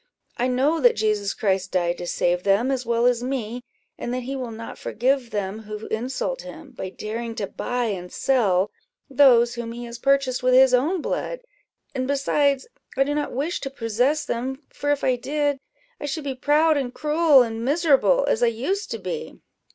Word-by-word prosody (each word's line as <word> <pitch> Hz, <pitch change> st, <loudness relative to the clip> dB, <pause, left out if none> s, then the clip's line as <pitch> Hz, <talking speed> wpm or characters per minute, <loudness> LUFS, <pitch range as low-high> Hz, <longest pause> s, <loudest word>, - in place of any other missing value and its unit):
I 245 Hz, -, +1 dB
know 270 Hz, +6 st, +2 dB
that 245 Hz, -2 st, +5 dB
Jesus 210 Hz, -2 st, 0 dB
Christ 190 Hz, -3 st, 0 dB
died 175 Hz, -1 st, 0 dB
to 175 Hz, -, -5 dB
save 175 Hz, +1 st, +1 dB
them 200 Hz, +7 st, +2 dB
as 255 Hz, -3 st, -2 dB
well 235 Hz, 0 st, +2 dB
as 245 Hz, -1 st, +3 dB
me, 245 Hz, -2 st, -3 dB, 0.4 s
and 240 Hz, -, -4 dB
that 255 Hz, -, -3 dB
he 270 Hz, +3 st, -4 dB
will 255 Hz, -3 st, -4 dB
not 225 Hz, 0 st, -8 dB
forgive 255 Hz, +1 st, 0 dB
them 205 Hz, -1 st, -3 dB
who 215 Hz, 0 st, -7 dB
insult 265 Hz, -, -2 dB
him, -, -, -11 dB
by 190 Hz, -, -6 dB
daring 225 Hz, +4 st, -5 dB
to 205 Hz, -, -2 dB
buy 245 Hz, +5 st, -3 dB
and 180 Hz, -5 st, -4 dB
sell 205 Hz, -7 st, +2 dB, 0.4 s
those 245 Hz, -3 st, +5 dB
whom 235 Hz, -1 st, -5 dB
he 240 Hz, +1 st, -7 dB
has 235 Hz, 0 st, -8 dB
purchased 275 Hz, -1 st, +2 dB
with 255 Hz, 0 st, +3 dB
his 260 Hz, 0 st, +6 dB
own 310 Hz, +8 st, +2 dB
blood; -, -, -3 dB, 0.5 s
and 255 Hz, -2 st, -2 dB
besides, 280 Hz, 0 st, +1 dB, 0.3 s
I 270 Hz, -, +5 dB
do 290 Hz, +2 st, -2 dB
not 295 Hz, 0 st, -2 dB
wish 295 Hz, +7 st, -2 dB
to 270 Hz, -, -4 dB
possess 250 Hz, +4 st, 0 dB
them; 265 Hz, +4 st, -3 dB
for 290 Hz, -, -3 dB
if 290 Hz, -1 st, +1 dB
I 255 Hz, -1 st, +2 dB
did, 290 Hz, +2 st, -1 dB, 0.4 s
I 290 Hz, -, -4 dB
should 295 Hz, +2 st, -3 dB
be 275 Hz, -1 st, -2 dB
proud 300 Hz, +4 st, +3 dB
and 260 Hz, -3 st, -2 dB
cruel 300 Hz, -2 st, +4 dB
and 225 Hz, -1 st, -4 dB
miserable, 325 Hz, -, +3 dB
as 225 Hz, -, +1 dB
I 240 Hz, -, +5 dB
used 275 Hz, -, -2 dB
to -, -, -3 dB
be." 470 Hz, -1 st, -6 dB
250 Hz, 195 wpm, -23 LUFS, 225-280 Hz, 0.5 s, his